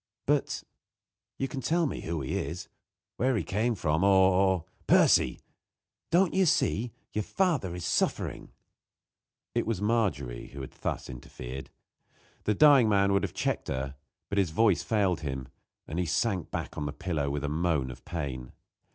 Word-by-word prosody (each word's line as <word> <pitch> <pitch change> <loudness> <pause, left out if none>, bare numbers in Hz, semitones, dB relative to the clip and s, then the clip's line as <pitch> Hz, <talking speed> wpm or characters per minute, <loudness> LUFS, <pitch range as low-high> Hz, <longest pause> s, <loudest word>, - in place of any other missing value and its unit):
"But - - +1 0.7
you 135 - -1
can 135 +1 -5
tell 165 +7 +2
me 140 - -3
who 80 -2 -3
he 65 - -3
is 90 +2 -4 0.5
where 130 +2 +2
he - - -1
came 110 +4 0
from 80 -2 0
or 95 -1 +5
or 95 -3 +2
" - - -35
"Percy! - - +4 0.7
Don't 175 +1 +3
you 190 -1 +3
see? 120 -5 +1 0.2
Your 105 - 0
father 145 - 0
is 90 - -5
suffering." - - -1 1.0
It - - 0
was 115 -5 0
Margery 100 - 0
who 70 - -6
had 65 - -7
thus - - -4
interfered. 65 +1 -8 0.8
The 105 - +2
dying 140 -3 +7
man 100 -1 +3
would 100 - +3
have - - -4
checked - - -1
her, 65 +1 -3 0.4
but 100 - +1
his 95 -4 +2
voice 100 +3 +3
failed 100 -7 +1
him, 65 -4 -5 0.4
and 80 +4 -3
he 90 - 0
sank 90 +1 0
back - - -4
on 75 - -2
the 75 - -4
pillow 75 -2 -2
with 70 0 -2
a - - 0
moan 75 -4 0
of 65 - -12
pain. 65 -7 -5
90 Hz, 170 wpm, -29 LUFS, 75-110 Hz, 1.0 s, dying